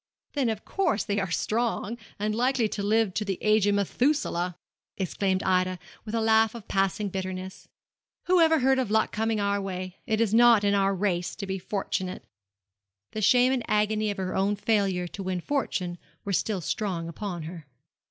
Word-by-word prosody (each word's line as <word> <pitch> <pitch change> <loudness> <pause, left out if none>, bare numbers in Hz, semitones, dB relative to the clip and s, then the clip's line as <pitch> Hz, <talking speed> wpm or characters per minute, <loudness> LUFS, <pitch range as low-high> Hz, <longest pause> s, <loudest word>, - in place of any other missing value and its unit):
'Then, 275 -5 +1
of 220 -1 -4
course, 370 - 0
they 205 -1 -1
are 190 -2 -2
strong, 230 +3 -1 0.2
and 210 +1 -1
likely 245 0 +2
to 210 - -4
live 210 -1 +2
to 215 - -1
the 195 -3 -2
age 215 -1 +3
of 205 - +3
Methuselah!' 200 - 0 0.4
exclaimed 190 0 -1
Ida, 185 -1 +1 0.3
with 215 +1 -4
a 225 - +1
laugh 220 0 +3
of 225 -4 -9
passing 195 +1 0
bitterness. 185 0 -5 0.6
'Who 365 -1 +4
ever 320 -2 +4
heard 265 +1 +3
of 250 -5 -1
luck 220 +1 +2
coming 220 0 0
our 200 0 0
way? 185 -1 -5
It 220 0 +1
is 225 -2 +1
not 235 -2 +6
in 200 0 +3
our 195 -1 +2
race 180 -2 -1
to 205 - -5
be 190 0 -3
fortunate.' 185 -1 -3 0.9
The 215 - -4
shame 250 +4 +5
and 255 - 0
agony 215 0 +1
of 205 - -3
her 185 -1 -3
own 200 +2 +1
failure 200 -4 +1
to 200 - -7
win 185 -1 -2
fortune 180 -7 -2 0.3
were 200 - -2
still 195 0 0
strong 175 -2 -2
upon 175 -1 -5
her. 165 -2 -8
205 Hz, 185 wpm, -27 LUFS, 185-225 Hz, 0.9 s, not